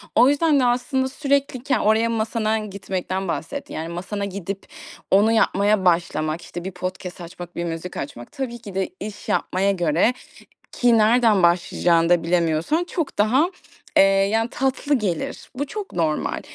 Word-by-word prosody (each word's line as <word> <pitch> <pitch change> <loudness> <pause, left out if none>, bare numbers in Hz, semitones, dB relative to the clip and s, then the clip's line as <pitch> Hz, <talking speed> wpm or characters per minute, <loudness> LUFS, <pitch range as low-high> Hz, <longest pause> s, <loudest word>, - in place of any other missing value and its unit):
O 250 +3 +6
yüzden 290 0 +3
de 250 - +3
aslında 260 +2 +1
sürekli 275 -3 -1
ken 280 - +1
oraya 220 +2 +3
masana 220 -1 0
gitmekten 190 -2 -4
bahsettin. 280 - -4
Yani, 160 +1 -4
masana 195 +4 -4
gidip 195 0 -6 0.5
onu 205 +4 +5
yapmaya 205 -2 +2
başlamak, 170 -2 +1
işte, 175 0 -8
bir 190 - -4
podcast 180 0 -6
açmak, 175 0 -9
bir 170 - -2
müzik 165 +2 -5
açmak 120 -4 -7
tabii 250 -3 -4
ki 205 -4 -10
de 190 -1 -1
iş 210 0 -7
yapmaya 195 +2 +1
göre, 175 +5 +2 0.6
ki 240 -2 +3
nereden 220 -3 +4
başlayacağını 170 -1 +3
da 175 -2 +4
bilemiyorsan 170 - +1
çok 340 -4 -4
daha, 255 - +3 0.5
eee, - - +8
yani, 195 +4 +2
tatlı 270 +2 0
gelir. 195 -9 -3
Bu 285 +3 -2
çok 410 +5 -6
normal. 160 -3 -1
200 Hz, 155 wpm, -22 LUFS, 175-245 Hz, 0.6 s, eee